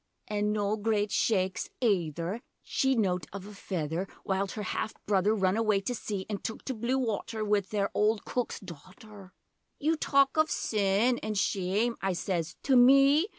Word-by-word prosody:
[An' 210 0 0
noa 210 0 0
great 210 -1 0
shaakes 190 -5 0
ayther 180 - 0 0.2
She'd 265 -1 +1
nowt 185 -5 0
of 195 -1 -7
a 210 - -10
feyther 175 -2 -3 0.2
While 195 0 -1
'er 210 - -3
half 215 - -3
brother 205 +1 +2
run 190 -2 +2
away 215 -3 +2
to 245 - -2
sea 205 -4 -4
An' 205 -2 -3
took 220 - -6
to 265 - -2
blue 240 +3 -1
water 225 -2 -2
Wi' 210 0 +3
their 200 +1 -2
ole 215 +2 +3
cook's 245 +3 -3
daughter] 190 - -12 0.5
'You 315 +3 +1
talk 275 -2 +2
of 315 0 +4
"sin" 215 +3 +1
an' 215 0 -4
"shame,"' 200 +4 0
I 195 -1 0
sez, 175 -2 -2
'to 270 - +3
me? 275 +6 +6
210 Hz, 170 wpm, -29 LUFS, 190-230 Hz, 0.5 s, me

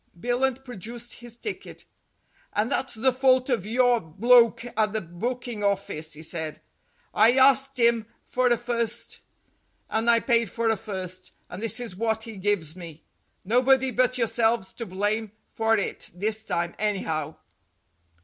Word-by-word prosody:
Billunt 255 +4 -1
produced 240 +1 -8
his 240 -1 -10
ticket. 415 - -7 0.7
"And 210 +3 0
that's 260 - -1
the 255 +4 +2
fault 260 0 +3
of 220 -5 0
your 245 +1 +3
bloke 230 +7 +4
at 215 -1 +1
the 220 - -1
booking 230 +5 -4
office," 190 -6 -1
he 155 +1 -8
said. 160 -1 -3 0.5
"I 225 +4 +5
arst 270 0 +5
him 235 -2 +3 0.2
for 255 0 0
a 240 -1 +3
first, 235 -1 -2 0.7
and 225 +2 +1
I 230 0 +6
paid 230 -3 +2
for 230 +2 0
a - - +2
first, 185 -3 -5 0.2
and 180 - -7
this 225 +1 +1
is 235 -7 -5
what 220 +2 -1
he 225 -3 -9
gives 185 -5 -1
me. 165 -4 -10 0.4
Nobody 255 +4 +3
but 255 0 +2
yourselves 230 -3 +1
to 230 - -6
blame 205 +3 -2 0.2
for 225 0 +2
it 200 - -2
this 215 +3 -1
time, 170 -3 -2
anyhow." 160 -7 -2
225 Hz, 150 wpm, -25 LUFS, 200-245 Hz, 0.7 s, I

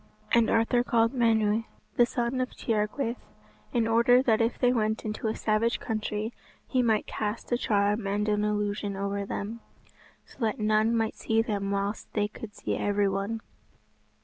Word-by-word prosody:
And 235 -1 +4
Arthur 230 +2 +3
called 230 0 +2
Menw, 225 -3 +2 0.3
the 240 - +5
son 245 +1 -1
of 255 - -1
Tiergwaeth, 230 +3 -1 0.5
in 230 -2 +1
order 235 +3 +5
that 225 -3 +3
if 230 +1 +1
they 250 -1 +3
went 220 -2 0
into 215 +1 -3
a 220 - -1
savage 220 +2 +1
country, 215 0 -3 0.3
he 255 - +2
might 220 -3 +2
cast 210 +3 -4
a - - +4
charm 205 -2 +1
and 205 +2 0
an 210 0 +1
illusion 205 -1 -1
over 200 0 -2
them, 220 +4 -4 0.7
so - - -19
that 220 -4 0
none 215 +2 +2
might 225 -1 0
see 225 0 +1
them 200 -3 -2
whilst 200 +1 -2
they 205 -1 +1
could 210 0 -10
see - - -2
every 205 0 +1
one. 200 +3 -2
220 Hz, 170 wpm, -28 LUFS, 210-230 Hz, 0.7 s, the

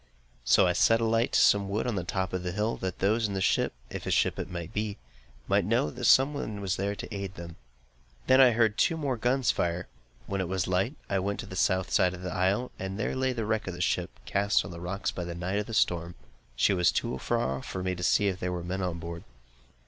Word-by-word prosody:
So - - +5
I - - +2
set 115 0 +4
a 115 - +1
light 115 +1 +1
to - - +5
some 100 -1 +4
wood 105 +2 -1
on 105 -8 -1
top 95 0 -2
of 95 - -1
the 90 0 -3
hill, 105 +3 0
that 95 -2 -4
those 110 +3 +2
in 100 - -4
the - - -1
ship, 95 - +2 0.2
if - - -5
ship - - +2
it - - -3
should 85 -2 -6
be, 105 -1 -2 0.5
might - - +3
know 115 +9 +1
that 125 -1 -5
some 135 +5 +6
one 110 -7 -4
was 95 -2 -1
there 100 +1 -2
to 105 - -7
aid 100 -1 -5
them. 85 -1 -9 0.7
I - - -30
then 130 -2 +6
heard 110 -2 +2
two 165 - +3
more 140 -5 -1
guns 125 +3 +1
fire. 85 +1 -2 0.4
When 100 +6 -2
it 95 - -2
was 95 0 -1
light, 95 +10 0
I 100 - 0
went 100 +2 -2
to - - -8
the 95 - -9
South 95 0 +1
side 90 0 +3
of 90 - -10
the 90 - -4
isle, 95 +6 0
and 95 +1 -4
there 110 - -2
lay 130 0 +1
the 115 -3 -3
wreck 110 -1 -1
of 90 - -4
a - - -9
ship, - - 0 0.2
cast 100 -1 +1
on 90 - -7
the 85 0 -8
rocks 95 +3 -2
in 90 -1 -4
the 85 - -5
night 90 +3 -2
by - - +1
the 115 - -8
storm. 85 -3 +1 0.4
She 100 - +3
was 90 -2 +3
too 65 - -2
far 65 +1 -1
off - - -10
for 95 - -4
me 95 0 0
to 90 - -7
see 100 +3 +3
if 95 -1 -1
there 90 - -2
were 90 -1 -4
men 95 +2 -3
on 90 -2 -2
board. 85 0 -7
95 Hz, 260 wpm, -28 LUFS, 90-110 Hz, 0.7 s, some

